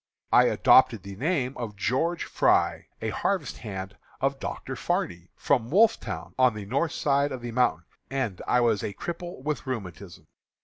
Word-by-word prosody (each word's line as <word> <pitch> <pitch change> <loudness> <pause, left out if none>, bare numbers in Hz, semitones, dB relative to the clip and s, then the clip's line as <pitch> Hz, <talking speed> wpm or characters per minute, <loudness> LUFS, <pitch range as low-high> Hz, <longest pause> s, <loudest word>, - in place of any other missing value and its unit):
I - - +7
adopted - - +5
the 100 0 -8
name 140 - -1
of 115 -4 -5
George 150 +12 0
Fry, - - +2 0.2
a - - 0
harvest 185 -9 -2
hand 95 -2 -6 0.2
of 135 0 0
Dr. - - -5
Farney, 85 0 -2
from 120 -5 +1
Wolfetown, 125 - +2
on 130 -3 +4
the 105 -2 -6
north 140 +9 0
side 140 0 +1
of 130 -2 -5
the 120 0 -5
mountain, 115 -9 +1 0.2
and 130 -9 -2
I 125 - +3
was 115 -4 +2
a 100 - -4
cripple 170 - -6
from 150 -2 -3
rheumatism. 100 -5 -7
125 Hz, 165 wpm, -27 LUFS, 100-140 Hz, 0.2 s, I